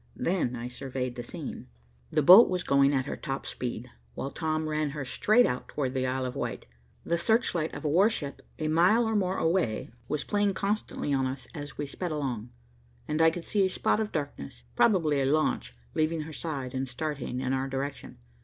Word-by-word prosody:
Then 170 -9 0
I 120 0 -5
surveyed 130 0 -4
the 120 - -5
scene. 120 - -7 0.4
The 155 -2 +1
boat 190 - +10
was 180 -1 -1
going 140 0 +4
at 130 -2 +1
her - - -4
top 135 0 -4
speed, 125 0 -5 0.2
while 135 - -4
Tom 155 -1 -1
ran 155 -1 0
her 140 - -3
straight 215 - +4
out 125 - -2
towards 130 -3 -2
the 130 -1 0
Isle 130 0 -1
of 125 - -4
Wight. - - -4 0.4
The 170 0 0
search 225 +7 +2
light 160 -2 -1
of - - -7
a - - +3
warship 165 -3 +1 0.2
a 155 - -2
mile 180 +9 +4
or 220 0 0
more 190 -2 +1
away 160 - 0 0.2
was 150 - -1
playing 205 -2 +1
constantly 200 -7 -1
on 135 -1 +2
us 130 -1 -5
as 145 -1 -7
we 145 - -2
sped 175 +5 -4
along, 130 -7 -3 0.6
and 155 +1 0
I 160 - +7
could 165 +1 -6
see 205 -2 +2
a 190 - +2
spot 200 - +1
of 215 -1 -2
darkness, 105 - -5
probably 160 -10 +3
a - - +1
launch, 135 - 0 0.2
leaving 155 +1 +1
her 155 +1 -7
side 140 -4 -4
and 130 0 -2
starting 140 -2 -3
in 130 0 -1
our 135 0 0
direction. 135 +1 -5
150 Hz, 205 wpm, -28 LUFS, 130-170 Hz, 0.6 s, boat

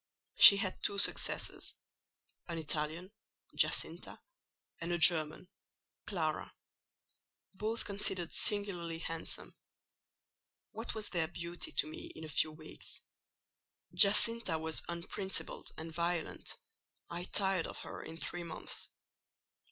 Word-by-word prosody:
She 200 - +10
had 195 -2 -1
two 200 - +1
successors: 200 - +3 0.7
an 170 -1 -4
Italian, 160 +4 -3 0.4
Giacinta, - - 0 0.6
and 170 +1 -4
a 175 - +1
German, 160 0 +5 0.6
Clara; 160 -6 -3 1.0
both 215 +4 -3
considered 195 -4 +1
singularly 180 -5 +1
handsome. 165 0 -4 1.2
What 225 +2 -5
was 215 -1 -4
their 165 -3 -1
beauty 170 +1 -6
to - - +2
me 155 - -9
in 160 - -9
a 155 - -7
few 155 +1 +1
weeks? 155 0 -8 0.9
Giacinta 210 -2 +4
was 160 0 0
unprincipled 180 +3 -3
and 160 +1 -7
violent: 170 0 -3 0.5
I 175 +1 -4
tired 190 -4 +1
of - - -8
her - - -8
in 165 - -9
three 175 +1 -3
months. 165 -2 -5
170 Hz, 115 wpm, -33 LUFS, 160-195 Hz, 1.2 s, She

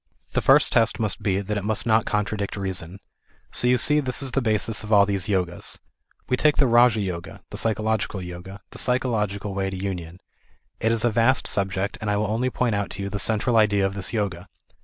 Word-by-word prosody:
The - - +1
first - - +4
test 115 -1 +3
must 110 -3 -1
be 95 -1 0
that 105 +1 -3
it - - -8
must 110 +1 0
not 110 -1 +2
contradict 105 -1 -2
reason. 95 -1 -3 0.5
So, 125 - 0
you 125 0 +4
see 150 +4 +3
this 130 -1 -1
is 135 - 0
the 135 - 0
basis 110 -1 0
of 110 - -7
all 100 -1 +6
these 100 -2 -1
Yogas. 90 -4 -1 0.5
We 125 - +2
take 150 +1 +3
the 140 - +4
Raja 120 -2 +5
Yoga, 90 -4 -5
the - - -6
psychological 110 -2 0
Yoga, 90 +2 -9
the - - -5
psychological 105 -6 -1
way 95 0 -1
to 95 - -5
union. 90 -3 -5 0.6
It 110 - +1
is 115 0 +1
a 120 - +3
vast 115 +4 +2
subject, 95 +1 -1
and 110 - -2
I 105 - +1
will 105 0 -1
only 120 +4 0
point 125 -2 -1
out 100 -1 -1
to 100 - -4
you 100 - -3
.the 105 - -3
central 115 +3 +2
idea 105 -2 +3
of 95 - -1
this 95 -2 -3
Yoga. 100 -5 -3
105 Hz, 220 wpm, -24 LUFS, 95-115 Hz, 0.6 s, all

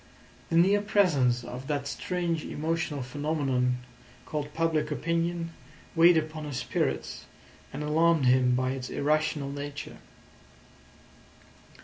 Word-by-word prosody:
The 165 - +2
near 195 +4 +5
presence 150 - +2
of 125 +2 -7
that 145 -2 -1
strange 170 +2 -2
emotional 155 -3 -2
phenomenon 135 -2 0 0.5
called 150 -1 -4
public 160 -2 +1
opinion 170 +3 -1 0.4
weighed 170 +1 +7
upon 155 0 -2
his 145 -4 -4
spirits, 65 - -2 0.5
and 145 +2 -5
alarmed 160 0 +3
him 125 0 +4
by 130 +1 0
its 130 -1 -5
irrational 150 -1 0
nature. 145 0 -6
150 Hz, 110 wpm, -28 LUFS, 135-165 Hz, 0.5 s, weighed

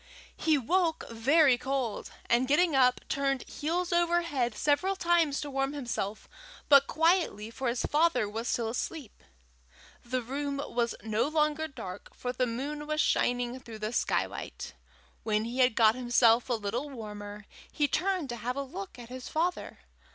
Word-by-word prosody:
He 315 -2 +2
woke 330 +5 0
very 265 +3 +4
cold, 265 -5 -2 0.2
and 240 +2 +3
getting 305 +2 +3
up, 250 -1 +4
turned 275 -2 0
heels 345 +4 -2
over 345 0 +3
head 255 -9 -1
several 365 +7 +1
times 340 -5 +2
to 290 - -5
warm 270 +1 -1
himself, 235 -7 -4 0.4
but 280 -1 +7
quietly, 325 - +1
for 260 +2 -4
his 240 +1 0
father 295 -8 +2
was 225 +3 -4
still 230 -2 0
asleep. 250 +1 -5 0.8
The 250 +1 -2
room 280 +3 -3
was 235 -1 -1
no 220 +3 0
longer 305 0 +1
dark, 185 -10 -9
for 250 0 -4
the 255 0 0
moon 290 +6 -4
was 305 0 -1
shining 245 -3 +1
through 230 -4 -10
the 215 +2 -4
skylight. - - -2 0.5
When 215 0 0
he 240 +3 -4
had 250 -3 +4
got 220 -1 +5
himself 240 -1 +3
a - - +2
little 230 +6 -3
warmer, 210 -4 -8 0.3
he 295 - +1
turned 365 0 0
to 240 - -4
have 250 +2 -3
a 280 - -2
look 195 -7 -8
at 240 -1 -10
his 255 0 -7
father. 345 +3 -2
260 Hz, 165 wpm, -29 LUFS, 235-300 Hz, 0.8 s, but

